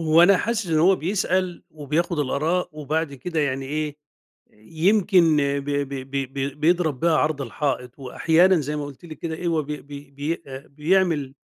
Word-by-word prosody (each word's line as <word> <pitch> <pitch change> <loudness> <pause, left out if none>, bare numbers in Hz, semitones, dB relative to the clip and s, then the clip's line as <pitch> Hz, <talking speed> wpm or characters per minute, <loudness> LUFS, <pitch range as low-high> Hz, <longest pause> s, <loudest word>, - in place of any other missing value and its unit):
هو 160 +1 +5
أنا 195 +2 +6
حاسس 225 +1 -1
إن 160 -2 +1
هو 185 +4 +5
بيسأل 185 0 -1
وبياخد 155 +3 -2
الآراء، 155 +6 0
وبعد 150 0 -2
كده 160 +4 -3
يعني 135 -2 -1
إيه، 150 +1 -3 0.6
يمكن 170 - +2
ب 140 -1 0
ب 145 -1 -1 0.2
ب 135 -1 -3
ب 140 +2 -4
بيضرب 160 -4 +2
بيها 165 -2 +3
عرض 150 -2 0
الحائط، 130 -1 -3
وأحيانًا 165 +7 +3
زي 150 +2 -3
ما 145 - -3
قلتِ 145 +4 -11
لِك 155 -3 -10
كده 160 -1 -4
إيه، 175 +2 -5
هو 160 -2 +1
بي 150 +1 -6
بي 145 0 -11
بي 150 +5 -4
آآ، 135 0 -9
بيعمل 150 -2 +1
155 Hz, 180 wpm, -23 LUFS, 140-170 Hz, 0.6 s, أنا